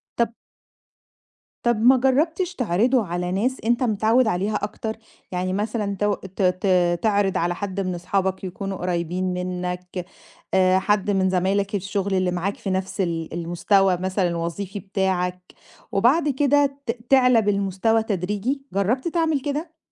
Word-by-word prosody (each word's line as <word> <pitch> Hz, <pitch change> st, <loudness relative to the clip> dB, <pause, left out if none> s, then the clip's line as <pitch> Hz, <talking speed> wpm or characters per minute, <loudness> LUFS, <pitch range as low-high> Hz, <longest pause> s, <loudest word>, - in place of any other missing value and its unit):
طَب 235 Hz, -1 st, 0 dB, 1.3 s
طَب 240 Hz, -1 st, +3 dB
ما 255 Hz, +2 st, +6 dB
جرّبتش 325 Hz, +8 st, +1 dB
تعرضُه 235 Hz, +2 st, +2 dB
على 175 Hz, +1 st, -3 dB
ناس 245 Hz, +8 st, 0 dB
أنت 240 Hz, +2 st, +2 dB
متعوِّد 225 Hz, +2 st, +3 dB
عليها 205 Hz, +2 st, 0 dB
أكتر؟ 220 Hz, +1 st, -3 dB, 0.3 s
يعني 185 Hz, +1 st, -1 dB
مثلًا 210 Hz, 0 st, -2 dB
تو 205 Hz, 0 st, +2 dB
ت 190 Hz, +1 st, -7 dB
ت 180 Hz, -2 st, +2 dB
تعرض 205 Hz, -3 st, +2 dB
على 175 Hz, +1 st, 0 dB
حد 200 Hz, 0 st, -4 dB
من 185 Hz, -2 st, -1 dB
أصحابك 190 Hz, +2 st, -1 dB
يكونوا 190 Hz, +1 st, -4 dB
قريبين 180 Hz, +1 st, -2 dB
منك 180 Hz, 0 st, -4 dB, 0.5 s
آآ، 185 Hz, 0 st, +4 dB
حد 205 Hz, 0 st, +1 dB
من 190 Hz, -1 st, +2 dB
زمايلك 195 Hz, +2 st, 0 dB
الشغل 195 Hz, 0 st, -2 dB
اللي 185 Hz, -1 st, +1 dB
معاك 180 Hz, +3 st, -2 dB
في 195 Hz, -, -5 dB
نفس 190 Hz, +1 st, -2 dB
ال 165 Hz, -3 st, -2 dB
المستوى 175 Hz, +2 st, +2 dB
مثلًا 185 Hz, 0 st, 0 dB
الوظيفي 175 Hz, +4 st, -4 dB
بتاعك، 185 Hz, -2 st, -1 dB, 0.5 s
وبعد 280 Hz, +10 st, +3 dB
كده 280 Hz, 0 st, +2 dB
ت 230 Hz, -, +1 dB, 0.2 s
تعلى 250 Hz, -4 st, +5 dB
بالمستوى 205 Hz, +2 st, +1 dB
تدريجي، 210 Hz, +7 st, -2 dB
جرّبت 230 Hz, -, 0 dB
تعمل 320 Hz, -4 st, +1 dB
كده؟ 310 Hz, +3 st, -4 dB
195 Hz, 140 wpm, -23 LUFS, 180-230 Hz, 1.3 s, ما